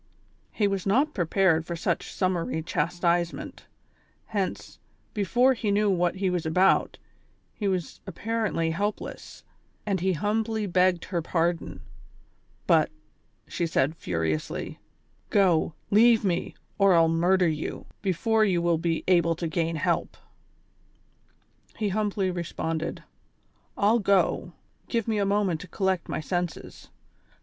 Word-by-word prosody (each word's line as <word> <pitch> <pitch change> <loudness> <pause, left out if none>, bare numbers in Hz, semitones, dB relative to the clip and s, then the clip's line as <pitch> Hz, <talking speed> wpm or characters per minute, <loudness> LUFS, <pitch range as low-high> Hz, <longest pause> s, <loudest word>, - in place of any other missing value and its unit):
He 210 - +1
was 195 -1 -2
not 275 +10 +2
prepared 175 -2 +2
for 170 +1 -5
such 165 - -2
summary 175 -4 -1
chastisement, 170 +2 -1 0.6
hence, 200 -4 -4 0.3
before 240 +6 +3
he 225 -4 -2
knew 205 0 +2
what 175 -1 +1
he 190 -1 0
was 175 -2 -1
about, 180 +4 +2 0.6
he 205 - -3
was 185 -4 -2
appa 190 +4 -8
rently 205 -8 0
helpless; 205 +5 -4 0.4
when 195 -3 0
he 190 +2 +1
humbly 215 +5 -1
begged 180 -2 +2
her 175 -3 -2
pardon! 170 0 -1 0.8
But, - - +4 0.6
she 170 - -2
said;, 155 -1 +1
furiously: 80 - -3 0.5
^' - - -38
Go, 175 -6 +2 0.2
leave 225 +1 +5
me, 175 -2 -1 0.2
or 195 -2 +5
I'll 165 -1 +5
murder 175 +3 +3
you, 155 -1 -3 0.2
before 215 +4 +1
you 190 -5 +2
will 170 -1 +1
be 165 -1 -1
able 170 -2 +3
to 170 +1 -3
gain 165 0 -1
help! 155 - -1 0.8
" - - -35
He 210 -2 0
humbly 200 -2 0
responded: 165 -1 -4 0.7
"I'll 215 +3 +3
go, 200 -2 +1 0.4
give 230 -2 -1
me 220 -2 0
a 200 - +2
moment 200 -5 +1
to 180 - -9
collect 190 -1 -1
my - - -2
senses." 175 +1 -4
185 Hz, 135 wpm, -26 LUFS, 170-205 Hz, 0.8 s, leave